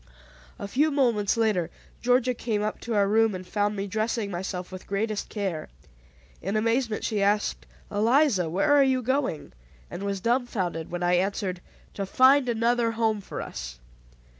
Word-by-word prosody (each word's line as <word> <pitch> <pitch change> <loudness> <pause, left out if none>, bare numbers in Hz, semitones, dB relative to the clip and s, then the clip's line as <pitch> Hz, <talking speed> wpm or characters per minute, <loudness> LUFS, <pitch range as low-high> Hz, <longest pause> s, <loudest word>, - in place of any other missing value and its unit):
A - - -5
few 290 +9 +2
moments 235 -8 +1
later 210 -7 +1 0.3
Georgia 250 +1 +3
came 220 -3 -2
up 215 - -3
to 230 -1 -3
our 200 -1 +3
room, 220 0 +3
and 185 0 -7
found 205 +2 0
me 195 0 -3
dressing 215 0 -2
myself 180 0 -4
with 185 0 -9
greatest 210 +1 -2
care. 195 -7 -3 0.7
In 195 +4 -2
amazement 225 +1 0
she 210 -3 -1
asked, 200 - 0 0.2
"Eliza, 225 - +3
where 195 - +2
are 290 - +6
you 260 -1 +1
going?" 260 - -1 0.4
and - - -6
was 200 -1 -2
dumbfounded 200 -8 -1
when 175 0 -4
I 175 0 +2
answered, 190 -1 -1 0.3
"To 195 -1 -4
find 260 +3 +5
another 230 0 +1
home 220 -2 0
for - - -6
us." - - -7
210 Hz, 165 wpm, -26 LUFS, 190-235 Hz, 0.7 s, are